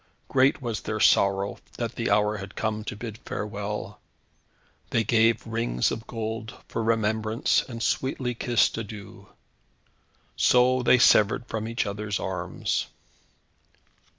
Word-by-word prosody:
Great 135 +1 +3
was 115 -3 -3
their 110 0 -3
sorrow 100 -1 +3 0.2
that - - -3
the - - -2
hour 105 0 +2
had 100 0 -9
come 110 -1 -2
to 110 - -5
bid 110 0 -7
farewell. 105 0 -5 0.9
They 115 - +1
gave 115 +1 +3
rings 115 - 0
of 110 - -5
gold 110 -1 -5
for - - -3
remembrance, 110 0 +1
and 115 -2 -5
sweetly 130 -2 -1
kissed 120 -1 +1
adieu. 105 -2 -9 1.1
So 125 +1 +4
they 125 - +5
severed 110 -1 +4
from 110 -2 -4
each 115 0 -1
other's 105 0 -3
arms. 95 -2 -2
110 Hz, 125 wpm, -26 LUFS, 105-115 Hz, 1.1 s, they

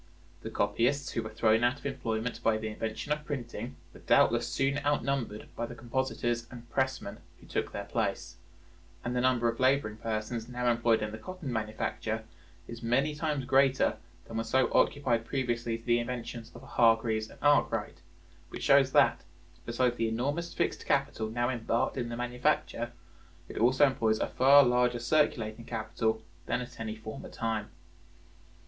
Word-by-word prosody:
The 110 - -5
copyists 120 +7 +1
who 115 - -1
were 110 - -6
thrown 110 +1 +2
out 120 +3 +3
of - - -17
employment 120 -4 -2
by 110 -1 +2
the 110 0 -4
invention 110 +6 -4
of 150 0 0
printing 145 -5 -5 0.2
were - - -13
doubtless - - +3
soon 135 +1 0
outnumbered 140 -6 -1
by 120 - -3
the 120 - -9
compositors 120 -1 -2
and 120 -1 -11
pressmen 130 -6 -1 0.2
who - - -16
took - - -2
their - - -4
place; 85 0 -2 0.7
and 120 +1 -2
the 125 - +2
number 125 -2 +3
of 115 0 -1
laboring 130 -5 +2
persons 110 +1 -3
now 125 0 +1
employed 115 -2 +2
in 105 - -3
the 110 - -7
cotton 165 0 -6
manufacture 110 0 -2 0.4
is 115 0 -8
many 130 +6 +1
times 150 -3 -2
greater 135 0 +3 0.3
than 115 - -6
were 115 - 0
so 130 0 +1
occupied 125 -5 +2
previously 120 -3 -1
to 115 - -19
the 120 -1 +3
inventions 120 -1 -5
of - - -11
Hargreaves 115 -1 +2
and - - -14
Arkwright, 145 -11 +2 0.5
which - - -7
shows 140 -1 +5
that, 140 -5 +4 0.4
besides 120 +1 +1
the 115 -1 +1
enormous 145 +9 -2
fixed 170 - -1
capital 135 -6 0
now 120 +2 0
embarked 115 -1 0
in 120 -3 -3
the 115 - -4
manufacture, 125 -1 -1 0.6
it - - -6
also 130 +5 +5
employs 115 -5 +1
a - - +1
far 140 +2 +7
larger 125 -1 +2
circulating 120 -4 +1
capital 110 0 -2 0.2
than 120 - 0
at 125 - -8
any 110 -1 -4
former 110 0 -8
time. 110 -2 -2
120 Hz, 165 wpm, -30 LUFS, 115-130 Hz, 0.7 s, far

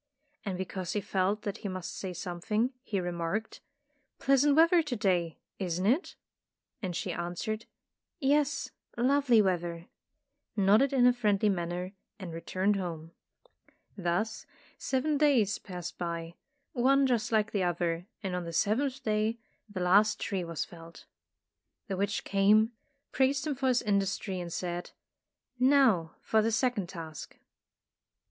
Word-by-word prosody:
And 195 -5 -3
because 185 -1 -4
he 210 - +1
felt 200 +1 0
that 205 +1 -3
he - - -5
must 185 -2 -5
say 190 - -4
something, 185 +8 -2
he 210 -7 -2
remarked, 175 +4 -3 0.3
" 290 -2 -45
Pleasant 275 +1 +4
weather 335 +2 +6
to 295 -6 -3
day, 180 -7 0 0.2
isn't 180 -1 -1
it?" 265 - +1 0.7
And 185 -4 -3
she 185 +1 -2
answered: 175 +6 -4 0.5
''Yes, 285 0 +1 0.3
lovely 250 -2 +4
weather," 175 -2 -2 0.7
nodded 210 +6 +4
in 260 -3 +4
a 250 - +6
friendly 210 -3 +2
manner 180 0 -2 0.2
and 185 -5 -7
returned 190 +4 0
home. 165 -3 -5 0.8
Thus 195 +4 -2 0.3
seven 280 +2 0
days 245 -9 +3
passed 180 -2 -7
by, 170 -1 -4 0.4
one 270 +2 +4
just 240 -2 +1
like 220 -1 +2
the 200 - 0
other, 175 0 -1 0.2
and 190 -2 -2
on 180 - -2
the 170 - -6
seventh 255 - 0
day 215 +1 0 0.3
the 195 -3 -5
last 200 +4 +4
tree 195 -4 -2
was 170 -2 -3
felled. 165 -1 -13 0.8
The 195 - -2
witch 200 +2 -1
came, 210 +3 +4 0.4
praised 270 +2 +2
him 305 - 0
for 265 0 -1
his 250 -1 +2
industry 200 -2 0
and 175 -1 -5
said, 175 0 -4 0.7
"Now 250 - +4
for 220 - +3
the 225 +1 +1
second 225 -5 0
task." 165 -5 -8
200 Hz, 140 wpm, -30 LUFS, 175-245 Hz, 0.8 s, weather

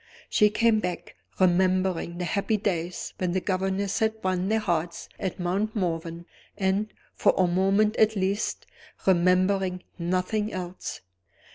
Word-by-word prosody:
She 210 - +5
came 225 +1 +3
back; 180 -3 -4 0.2
remembering 185 -1 +2
the 180 - -2
happy 200 +4 0
days 180 -4 -2
when 180 -2 0
the 185 - +2
governess 190 +1 -1
had 220 0 +1
won 185 0 0
their 220 - +3
hearts 175 -5 -2
at 190 -3 -3
Mount 195 +5 -1
Morven, 170 -3 -2 0.3
and, 200 +2 0 0.2
for - - +3
a 185 - +4
moment 195 +4 +2
at 220 0 +4
least, 195 +1 -1 0.4
remembering 185 0 +2 0.2
nothing 185 +5 -1
else. 180 0 -6
185 Hz, 135 wpm, -26 LUFS, 180-205 Hz, 0.4 s, She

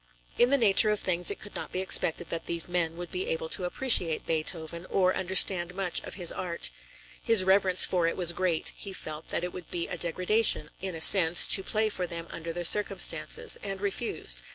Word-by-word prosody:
In 240 - +3
the 280 - +2
nature 215 -3 +5
of 210 -1 -1
things 175 -1 +1
it - - -3
could 205 - -10
not - - -6
be 185 - -4
expected 175 -3 0
that 165 -1 -6
these 170 -1 -2
men 170 -2 -3
would 175 0 -9
be 370 +4 -5
able 485 0 -4
to 185 - -1
appreciate 180 -5 +1
Beethoven, 165 +1 -4
or 185 -1 0
understand 185 -1 +2
much 195 -3 -1
of - - -10
his 175 -3 +2
art. 170 - -4 0.5
His 225 -5 +3
reverence 190 -1 +4
for 175 -3 -1
it 165 - -4
was 175 -2 +1
great; 175 -3 -1
he 195 - -9
felt 155 -3 -8
that - - -4
it 180 - -6
would 180 - -11
be 170 -1 -4
a 180 - -8
degradation, 180 0 0
in 190 -2 -6
a 160 - -8
sense, 175 -1 +7
to 195 - +3
play 215 +3 -2
for 185 -4 -5
them 170 -1 -8
under 165 0 -7
the 175 +1 -6
circumstances, 435 - +2
and 195 -1 -6
refused. 190 - -2
180 Hz, 210 wpm, -26 LUFS, 170-195 Hz, 0.5 s, sense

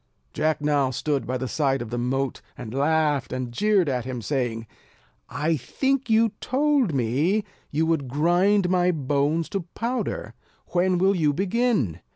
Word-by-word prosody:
Jack 155 0 0
now 145 -3 +2
stood 140 +2 -2
by 130 - -1
the 130 - -3
side 135 -1 0
of 120 -1 -6
the 120 - -2
moat, 135 +2 -1 0.2
and 120 -2 -7
laughed 145 -1 +1
and 130 -1 -3
jeered 200 - +2
at 125 -3 -1
him, 130 0 -5
saying: 120 -3 -2 0.6
"I 155 +3 0
think 270 - -1
you 225 +1 +4
told 275 - +2
me, 140 - +1 0.3
you 155 +2 0
would 160 -5 0
grind 175 +8 +2
my 180 0 +2
bones 150 +1 0
to 190 -4 -4
powder. 245 +2 -3 0.4
When 180 +1 +2
will 190 +2 +3
you 155 -4 +2
begin?" 195 - 0
150 Hz, 160 wpm, -24 LUFS, 130-190 Hz, 0.6 s, you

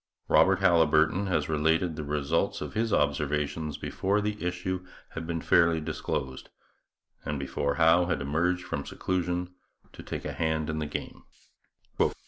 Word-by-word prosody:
Robert - - +5
Haliburton 85 +1 +4
has 80 -5 0
related 80 +2 +1
the 75 - -4
results 75 -1 0
of - - -6
his 115 +1 0
observations 75 0 0
before 100 +2 0
the 105 -1 -3
issue 90 +1 -2 0.3
had 80 0 -6
been 85 -1 -2
fairly 85 0 +4
disclosed 65 -4 -4 0.7
and 75 - -3
before 70 +1 -2
Howe 85 +2 +4
had 90 - 0
emerged 85 +6 0
from 70 - -4
seclusion 90 +1 -2 0.4
to - - -10
take - - -6
a - - -3
hand 80 -1 -1
in 80 - -3
the 75 - -2
game. 75 - -6
80 Hz, 145 wpm, -28 LUFS, 75-90 Hz, 0.7 s, Robert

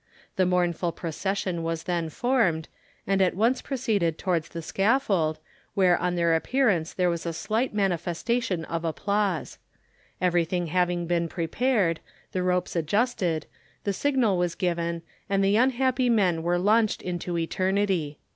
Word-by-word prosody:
The 185 -3 +2
mournful 175 -1 +1
procession 185 +1 -3
was 165 0 -3
then 170 -2 -1
formed, 185 - +1 0.4
and 195 0 +1
at 185 -2 +2
once 230 +6 +2
proceeded 215 - 0
towards 170 -4 -1
the 165 -1 -6
scaffold, 195 - +1 0.4
where 185 -3 +4
on 180 0 -1
their 170 -1 +2
appearance 185 -2 +1
there 180 -1 +1
was 170 -1 -3
a 165 - -2
slight 220 +9 -1
manifestation 190 0 -1
of 165 +1 -3
applause. 200 +2 -1 0.6
Everything 175 0 +1
having 175 +1 0
been 170 0 0
prepared, 180 +1 0 0.3
the 185 - -1
ropes 180 0 0
adjusted, 175 -1 0 0.4
the 200 - 0
signal 240 -6 +1
was 175 -1 0
given, 170 -2 -1 0.3
and 195 0 +2
the 195 +1 +3
unhappy 255 +1 +2
men 185 -8 +2
were 175 +2 +1
launched 215 +4 +2
into 175 -1 -3
eternity. 185 -3 0
180 Hz, 140 wpm, -26 LUFS, 170-205 Hz, 0.6 s, where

